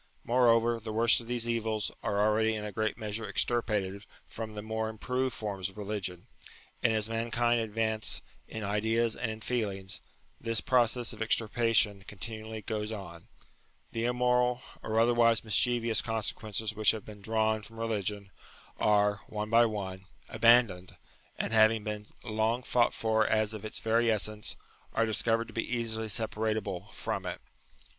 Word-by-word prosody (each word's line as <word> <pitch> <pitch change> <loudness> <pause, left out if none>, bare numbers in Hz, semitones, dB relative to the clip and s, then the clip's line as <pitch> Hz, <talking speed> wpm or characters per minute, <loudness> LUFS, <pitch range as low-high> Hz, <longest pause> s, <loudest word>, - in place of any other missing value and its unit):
Moreover, 120 -1 +3
the 110 0 -6
worst 115 +2 +5
of 115 - -12
these 120 -1 0
evils 110 -2 -1
are 100 - -1
already 110 +1 +2
in 105 -1 -4
a 105 - -4
great 110 +2 -1
measure 110 -1 -4
extirpated 105 -5 0 0.2
from 110 -1 -7
the 105 - -5
more 110 0 -2
im 110 - -9
proved 125 +2 -1
forms 100 -3 -3
of 95 - -18
religion; 100 -4 -4 0.6
and - - +3
as 110 -1 +1
mankind 115 +1 +1
advance 110 0 0 0.2
in 110 - -6
ideas 110 +3 +1
and 120 -1 -2
in 110 0 -6
feelings, 100 -6 -2 0.4
this 115 -1 -1
process 120 -1 +2
of - - -10
extirpation 110 -2 +3
continually 110 +1 -6
goes 105 0 -3
on: 95 -6 -8 0.6
the 115 0 -2
immoral, 125 0 +2 0.2
or 110 0 0
otherwise 115 -1 +4
mis 110 -2 -3
chievous 120 -3 +2
consequences 110 -1 -2
which 110 -1 +3
have 110 -3 +1
been 105 -1 -11
drawn 110 +1 +1
from 115 +2 -12
religion, 105 -3 -2 0.5
are, 105 -1 +3
one 105 0 -4
by 115 +1 +6
one, 95 -3 -5 0.2
abandoned, 115 -6 +4 0.4
and, - - -2
after - - +3
having 110 0 +5
been 105 -1 -5 0.2
long 110 +2 0
fought 120 -1 +2
for 110 -1 +1
as 110 0 +1
of 110 -1 -7
its 110 - -4
very 115 +1 +2
essence, 105 -1 -1 0.4
are 115 - +2
dis 110 -2 +1
covered 115 0 +1
to - - -12
be 115 - -1
easily 110 -1 -2
separable 105 -3 -2
from - - -4
it. - - -5
110 Hz, 165 wpm, -30 LUFS, 105-115 Hz, 0.6 s, by